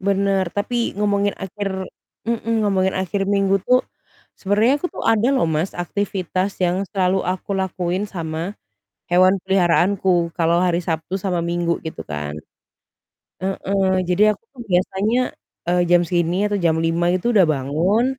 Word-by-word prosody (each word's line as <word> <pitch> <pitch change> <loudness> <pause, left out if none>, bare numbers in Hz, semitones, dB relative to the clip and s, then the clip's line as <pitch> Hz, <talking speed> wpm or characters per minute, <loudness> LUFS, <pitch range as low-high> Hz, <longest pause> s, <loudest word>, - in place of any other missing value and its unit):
Bener, 195 0 +1
tapi 230 +4 -1
ngomongin 205 -1 +1
akhir 190 0 -4 0.4
mhm, 230 -1 0
ngomongin 190 -2 +1
akhir 195 +1 -1
minggu 195 0 +2
tuh 250 0 +4 0.6
sebenarnya 215 +7 +2
aku 360 - -3
tuh - - -7
ada 225 +1 +3
loh 260 -11 +2
Mas, 160 +4 -1
aktivitas 185 +1 -2
yang 180 +2 +1
selalu 190 -1 +1
aku 185 +2 -2
lakuin 185 0 -1
sama 165 -1 -4 0.6
hewan 185 +2 +4
peliharaanku 180 -1 +2
kalau 170 0 +2
hari 180 -1 +1
Sabtu 165 +2 -3
sama 185 -2 -1
Minggu 170 0 -1
gitu 160 - -6
kan. 75 0 -5 1.0
Heeh, 190 0 0
jadi 210 +4 +4
aku 200 - -17
tuh 255 - -10
biasanya, 195 +4 +1 0.5
eee, 180 0 +3
jam 175 0 +6
segini 175 +4 0
atau 205 - 0
jam 170 -4 +2
05:00 165 +1 +1
itu 185 +6 0
udah 195 -5 +6
bangun 160 - +1
190 Hz, 145 wpm, -21 LUFS, 175-200 Hz, 1.0 s, jam